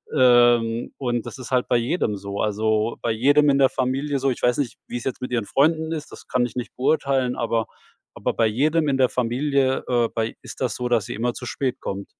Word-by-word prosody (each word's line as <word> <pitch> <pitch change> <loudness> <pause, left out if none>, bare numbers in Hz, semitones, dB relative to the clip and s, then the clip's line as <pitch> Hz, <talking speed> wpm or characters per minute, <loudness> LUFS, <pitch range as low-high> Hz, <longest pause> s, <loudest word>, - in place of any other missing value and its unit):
Ähm, 120 -2 +4
und 120 -3 -2
das - - -8
ist 130 - -9
halt 125 -1 +1
bei 120 - +3
jedem 120 - 0
so. 100 +1 -5
Also, 110 +1 0
äh, - - -29
bei 115 - 0
jedem 145 +6 +4
in 140 - +3
der 135 - +5
Familie 135 +2 -1
so, 135 +1 +1
ich - - -5
weiß 125 +3 +2
nicht, 130 -5 -2
wie - - -4
es 120 - -7
jetzt 130 -1 -4
mit 125 - -5
ihren 115 -4 0
Freunden 160 +5 +1
ist. 155 -2 -5
Das - - -12
kann 125 -1 +1
ich 120 - -7
nicht 125 - -5
beurteilen, 135 -2 +1
aber 115 -1 0 0.5
aber - - -1
bei 115 - +2
jedem 150 +8 +1
in 135 - +1
der 130 -2 +3
Familie, 130 +2 0
äh, 120 -2 +2
bei 115 0 -2
ist - - -10
das 125 -4 0
so, 125 0 -3
dass 115 -3 +2
sie - - -5
immer 120 +2 -1
zu 125 - -8
spät 130 0 -2
kommt. 100 0 -4
125 Hz, 240 wpm, -23 LUFS, 115-135 Hz, 0.5 s, der